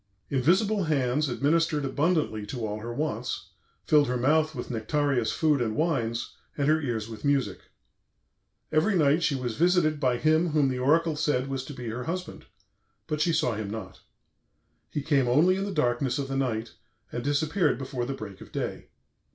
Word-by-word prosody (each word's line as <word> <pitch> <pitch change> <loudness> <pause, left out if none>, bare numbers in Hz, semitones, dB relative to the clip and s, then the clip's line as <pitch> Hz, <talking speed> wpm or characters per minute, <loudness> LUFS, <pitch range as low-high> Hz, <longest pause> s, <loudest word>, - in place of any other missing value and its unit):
Invisible 190 - +2
hands 140 -1 +1
administered 150 +3 +1
abundantly 145 -5 0
to 120 -4 -4
all 105 0 -4
her 115 +2 -6
wants, 150 +6 -3 0.4
filled 150 -2 +4
her 125 0 0
mouth 155 +5 +2
with 120 - -5
nectareous 125 +1 0
food 150 -4 +2
and 110 -2 -1
wines, 120 -8 -1 0.2
and 140 -1 +1
her 155 +1 +3
ears 115 -6 -2
with 110 -2 -9
music. 140 -2 +1 1.1
Every 170 +7 +2
night 150 -1 +3
she 150 -3 +1
was 125 -4 -3
visited 165 -2 +3
by 125 -3 +2
him 155 +5 +3
whom 150 -3 +2
the 130 -1 -2
oracle 160 +4 +3
said 145 -3 0
was 135 -1 -3
to 145 - -8
be 125 -2 -7
her 120 +2 -4
husband, 180 +3 -5 0.6
but 155 -1 -2
she 170 - +3
saw 155 -6 +1
him 105 -2 -4
not. 100 -4 -7 0.9
He 145 - -3
came 140 -4 +2
only 155 +9 +4
in 195 +1 -2
the 200 - -3
darkness 125 -5 0
of 140 -1 -3
the 135 - -2
night, 120 -4 -1 0.4
and 120 - -4
disappeared 150 +3 +1
before 130 -2 -4
the 135 - -3
break 100 -6 -9
of - - -12
day. - - -4
140 Hz, 180 wpm, -27 LUFS, 120-155 Hz, 1.1 s, filled